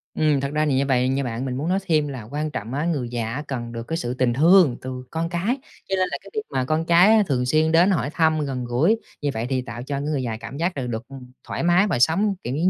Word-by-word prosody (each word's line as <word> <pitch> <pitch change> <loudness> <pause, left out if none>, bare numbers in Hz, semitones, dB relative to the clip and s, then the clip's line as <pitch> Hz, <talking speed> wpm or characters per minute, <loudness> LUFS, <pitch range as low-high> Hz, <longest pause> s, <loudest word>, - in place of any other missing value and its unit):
Ừm, 150 -2 +2
thật 140 0 -2
ra 155 0 +1
thì 145 - +1
như 135 +1 +2
vậy 130 -2 +2
nha 135 +1 0
bạn, 120 +1 -3
mình 130 -1 -3
muốn 150 +5 -2
nói 190 +2 +2
thêm 155 -3 +2
là 130 -5 -6
quan 150 +1 -2
trọng 115 -2 -5
á, 145 +4 -1
người 145 -8 -1
già 115 -2 -3
á 145 +4 -4
cần 120 -3 -4
được 115 0 -7
cái 165 - -2
sự 120 -7 -3
tình 125 -2 +1
thương 160 -1 +5
từ 130 0 -6
con 165 +1 -2
cái, 185 +9 -1 0.3
cho 195 - +1
nên 185 -1 +1
là - - -2
cái 195 - -13
việc 215 - -1
mà 130 -2 0
con 155 +4 0
cái 175 +5 +6
á 215 - +5
thường 125 -3 0
xuyên 155 +4 +2
đến 175 +4 +5
hỏi 165 -6 0
thăm, 160 -2 +2
gần 130 -3 -3
gũi 145 - +2 0.2
như 145 - 0
vậy 110 +1 -2
thì 130 -1 0
tạo 120 -1 -7
cho 140 +2 -4
cái 140 - -2
người 145 -2 -1
già 115 -3 -3
cảm 125 +4 -8
giác 170 +1 -1
là 130 -2 -3
được, 115 0 -5
ừm, 130 -2 -11 0.2
thoải - - -3
mái 175 +4 +4
và 160 - 0
sống, 195 - +3
kiểu, 125 +3 -3
giống 170 +5 +2
140 Hz, 300 wpm, -23 LUFS, 125-165 Hz, 0.3 s, cái